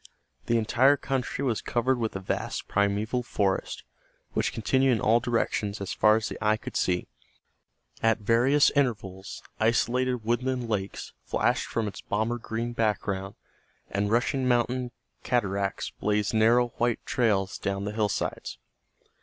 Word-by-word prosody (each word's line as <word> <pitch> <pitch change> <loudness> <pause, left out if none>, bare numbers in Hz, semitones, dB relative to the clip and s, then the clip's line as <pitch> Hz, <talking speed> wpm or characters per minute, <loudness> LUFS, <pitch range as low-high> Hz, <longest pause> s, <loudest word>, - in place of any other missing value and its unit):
The 120 - +3
entire 125 +5 +4
country 135 0 -2
was 120 -5 0
covered 125 +1 0
with 110 -3 -2
a - - -2
vast 95 - -3
primeval 105 +4 0
forest 100 -5 -1 0.5
which - - 0
continued 130 +4 +2
in 115 - 0
all 115 +3 +4
directions 115 -3 -1
as 100 - -4
far 105 0 +5
as 110 0 -1
the - - -6
eye 110 0 +3
could - - -9
see. 90 -1 0 0.9
At 115 0 +3
various 120 +7 +4
intervals 100 -8 -2 0.2
isolated 120 +2 +1
woodland 125 +1 0
lakes 100 -3 -3
flashed - - 0
from 115 -2 -1
its 100 - -7
Bomber 110 +4 -1
green 115 +1 -4
background 100 -3 -1 0.6
and 100 +1 0
rushing 125 +3 +1
mountain 125 +1 +1 0.3
cataracts 100 -5 -1
blazed 105 0 -1
narrow 120 +2 +4
white 120 -1 0
trails 100 -6 +1
down 100 0 -2
the 105 - -2
hillsides. 105 -2 -2
115 Hz, 140 wpm, -27 LUFS, 105-120 Hz, 0.9 s, far